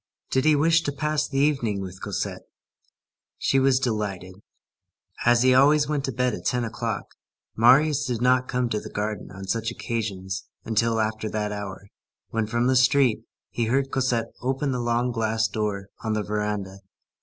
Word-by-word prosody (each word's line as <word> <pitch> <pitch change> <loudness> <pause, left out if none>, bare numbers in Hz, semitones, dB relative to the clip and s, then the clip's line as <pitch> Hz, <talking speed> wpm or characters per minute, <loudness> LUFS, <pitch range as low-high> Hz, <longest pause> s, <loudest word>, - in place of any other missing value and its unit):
Did 130 +2 +2
he 155 -1 +5
wish 160 +3 +4
to 145 - -2
pass 150 +1 -1
the 135 - -4
evening 135 -8 +1
with 95 -1 -7
Cosette? - - -3 1.0
She 135 - +2
was 135 -1 +3
delighted. 105 -7 -2 0.9
As 120 0 +5
he 130 0 +5
always 145 +3 +5
went 145 -2 -1
to 135 - -2
bed 125 +1 0
at - - -6
ten 125 -1 0
o'clock, 115 - -3 0.5
Marius 135 +6 +5
did 120 -3 -2
not 125 +1 +3
come 125 0 0
to 110 - -1
the - - -9
garden 105 +1 -4
on 95 0 -9
such 115 +4 -1
occasions 100 -6 -4 0.2
until 115 0 +1
after 110 0 -1
that 105 -1 -2
hour, 100 -1 -6 0.4
when, 110 -1 -1
from 120 +2 0
the 130 +1 +3
street, 130 -3 +3 0.3
he 120 - -1
heard 135 +4 0
Cosette 120 -3 0
open 135 +2 -1
the 125 - -1
long 120 +1 0
glass 110 -1 0
door 100 -2 -3
on 110 -1 -1
the 105 -1 -1
veranda. 105 -2 -3
115 Hz, 175 wpm, -25 LUFS, 105-130 Hz, 1.0 s, he